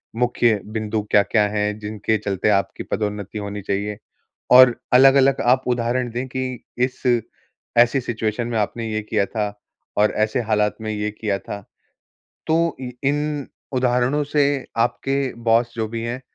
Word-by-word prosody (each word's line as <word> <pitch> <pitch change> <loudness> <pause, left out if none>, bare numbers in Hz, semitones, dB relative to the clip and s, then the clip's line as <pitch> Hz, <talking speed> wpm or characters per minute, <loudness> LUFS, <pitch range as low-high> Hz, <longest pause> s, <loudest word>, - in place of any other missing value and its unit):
मुख्य 120 -3 +2
बिंदु 110 0 -2
क्या-क्या 105 +1 +4
हैं, 105 0 -1
जिनके 110 +1 -1
चलते 100 0 -1
आपकी 100 -3 0
पदोन्नति 105 0 -3
होनी 100 0 -5
चाहिए, 100 +1 -2 0.5
और 125 -1 +8 0.2
अलग-अलग 135 +1 +6
आप 125 +2 +3
उदाहरण 125 0 0
दें 125 +3 -3
कि 130 -1 -4
इस 125 +1 -1 0.8
ऐसी 120 +3 +5
सिचुएशन 115 0 -2
में 120 -1 -2
आपने 115 +2 -2
ये 110 0 -1
किया 105 -1 0
था, 105 -1 -3 0.4
और 105 +1 +4
ऐसे 110 +4 +1
हालात 105 -2 +1
में 110 - -3
ये 105 0 -2
किया 100 -3 0
था। 100 +1 -7 0.9
तो 165 +1 +2
इ 125 - -5
इन 145 0 -1 0.3
उदाहरणों 125 +3 +1
से 145 +1 +1 0.4
आपके 135 +3 0
बॉस 115 +1 +2
जो 110 -1 -2
भी 115 0 -4
हैं, 120 +2 -4
115 Hz, 150 wpm, -21 LUFS, 105-125 Hz, 0.9 s, और